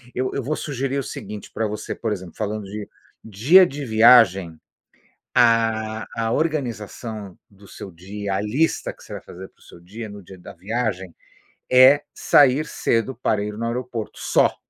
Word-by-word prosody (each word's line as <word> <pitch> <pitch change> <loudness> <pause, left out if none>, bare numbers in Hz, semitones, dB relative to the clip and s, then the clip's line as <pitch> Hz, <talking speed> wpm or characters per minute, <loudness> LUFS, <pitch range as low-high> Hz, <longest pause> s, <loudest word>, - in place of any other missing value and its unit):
eu 130 +1 -1
eu 140 - -2
vou 150 +5 -2
sugerir 135 -2 -3
o - - -3
seguinte 105 -2 -8
para 110 -1 -1
você, 105 0 -5
por 110 -2 -3
exemplo, 90 -4 -8
falando 105 0 -3
de 105 +1 -7 0.3
dia 130 - +5
de 145 -1 -6
viagem, 110 -7 +5 0.8
ah, 110 -2 +2
a 115 0 -1
organização 115 - -3
do 100 0 -18
seu 95 - -10
dia, 100 +3 -6
a 95 - -1
lista 130 +11 0
que - - -20
você - - -10
vai - - -8
fazer 95 +2 -11
para - - -39
o - - -22
seu - - -16
dia 105 +6 -9
no 105 -1 -10
dia 95 +1 -13
da 90 - -11
viagem, 95 -2 -3 0.6
é 130 +3 +7
sair 145 +1 +4
cedo 115 -2 -1
para 110 -3 0
ir 105 0 -4
no 115 - -3
aeroporto, 120 -2 -5
só. - - +2
110 Hz, 175 wpm, -22 LUFS, 100-125 Hz, 0.8 s, é